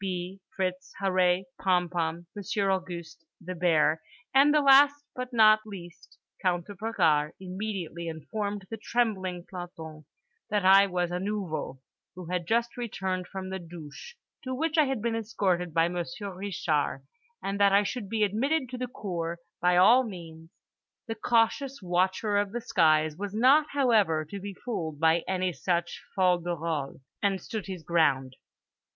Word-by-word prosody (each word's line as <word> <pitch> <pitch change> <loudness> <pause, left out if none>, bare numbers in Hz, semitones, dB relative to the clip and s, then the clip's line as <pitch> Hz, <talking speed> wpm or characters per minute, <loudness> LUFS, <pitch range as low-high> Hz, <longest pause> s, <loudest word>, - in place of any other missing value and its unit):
B., 185 0 -4
Fritz, 185 -1 -3
Harree, 185 -1 +2 0.2
Pompom, 175 -2 0
Monsieur 200 0 -1
Auguste, 170 -3 -4 0.2
The 185 +1 -6
Bear, 165 -2 +2 0.3
and 275 +2 +6
the 300 - +4
last 280 0 +7 0.2
but 250 0 -5
not 215 -2 +6
least 185 -5 -11 0.2
Count 175 -2 0
de 205 - -9
Bragard 170 -8 +1
immediately 185 -3 -5
informed 200 +5 -4
the 225 - -4
trembling 190 -7 -1
planton 160 -4 -9 0.4
that 205 -2 0
I 195 +1 +7
was 180 -2 -1
a 180 - -2
Nouveau 185 -9 -4 0.3
who 180 -1 -8
had 180 -2 -2
just 235 +3 0
returned 190 -6 -3
from 190 0 -6
the 190 - -3
douches 170 - -10 0.3
to 260 0 -3
which 320 +3 -1
I 310 -2 +5
had 265 -5 -2
been 235 -1 0
escorted 195 -6 -1
by 165 +1 +3
Monsieur 175 +3 -5
Reeshar, 175 -6 -1 0.4
and 195 +1 -2
that 200 -1 +5
I 200 +1 +5
should 205 -1 -4
be 220 -1 +1
admitted 255 +7 0
to 250 0 -6
the 250 - -2
cour 170 -7 -4 0.2
by 180 0 +3
all 230 +8 +7
means. 165 -7 -9 0.6
The 225 - -3
cautious 235 +5 +1
watcher 185 +3 0
of 205 0 0
the 240 - -3
skies 155 -8 +2
was 205 +1 -5
not, 275 +7 +5
however, 215 - +3
to 200 - -5
be 200 0 -7
fooled 160 - -5
by 165 +1 +4
any 185 -1 0
such 170 +3 -2
fol 180 -2 +3
de 175 0 -3
rol 155 -4 -4 0.2
and 195 -1 +1
stood 215 +3 -6
his 185 -4 -6
ground. 140 -6 +1
185 Hz, 160 wpm, -28 LUFS, 170-215 Hz, 0.6 s, last